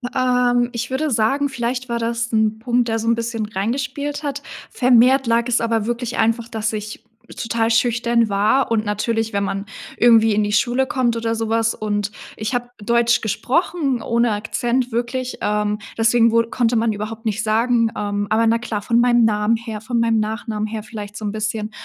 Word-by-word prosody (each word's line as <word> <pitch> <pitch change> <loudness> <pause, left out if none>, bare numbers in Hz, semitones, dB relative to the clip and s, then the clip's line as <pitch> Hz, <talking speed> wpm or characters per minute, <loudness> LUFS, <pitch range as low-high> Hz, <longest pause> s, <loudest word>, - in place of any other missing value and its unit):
Ähm, 250 -1 +2
ich 240 +2 -4
würde 280 +3 -1
sagen, 270 +6 +1
vielleicht 250 0 -3
war 235 0 -1
das 235 0 -2
'n 220 0 +1
Punkt, 240 0 +1
der 225 0 0
so 225 - -4
'n 230 - +4
bisschen 230 -1 -3
reingespielt 270 +8 -3
hat. 285 -1 -3 0.3
Vermehrt 255 +1 +4
lag 235 +1 +2
es 240 -1 +1
aber 225 -2 0
wirklich 240 0 -3
einfach, 230 +1 +1
dass 220 -1 -3
ich 215 +2 -6 0.3
total 230 0 0
schüchtern 235 0 +2
war 215 +6 +1
und 220 -1 +2
natürlich 225 +2 -1
wenn 200 -1 -1
man 195 +1 -3 0.3
irgendwie 225 -2 +5
in 210 0 +2
die 205 - -1
Schule 245 +5 +2
kommt 245 -3 0
oder 230 0 -1
so 225 0 -2
was 225 0 +1
und 205 -1 -2 0.2
ich 215 +4 -4
hab 245 0 -4
Deutsch 235 +2 +2
gesprochen 270 - -1
ohne 235 -1 +1
Akzent 240 +4 -1
wirklich, 245 +2 -3
ähm, 210 0 0 0.2
deswegen 230 0 +4
wur 230 0 +2
konnte 235 -1 +1
man 225 0 +2
überhaupt 215 +2 -6
nicht 215 0 -1
sagen, 230 +1 +2
ähm, 205 0 -2
aber 225 +1 +2
na 230 +1 +3
klar, 225 -3 -4
von 235 +3 +1
meinem 240 -1 +4
Namen 210 +1 +2
her, 225 -2 -6
von 235 +2 -3
meinem 230 -1 +2
Nachnamen 215 0 -3
her 215 -1 -5
vielleicht 210 -2 -8
so 215 - -7
'n 205 - -2
bisschen. 215 0 -3
230 Hz, 190 wpm, -20 LUFS, 215-240 Hz, 0.3 s, irgendwie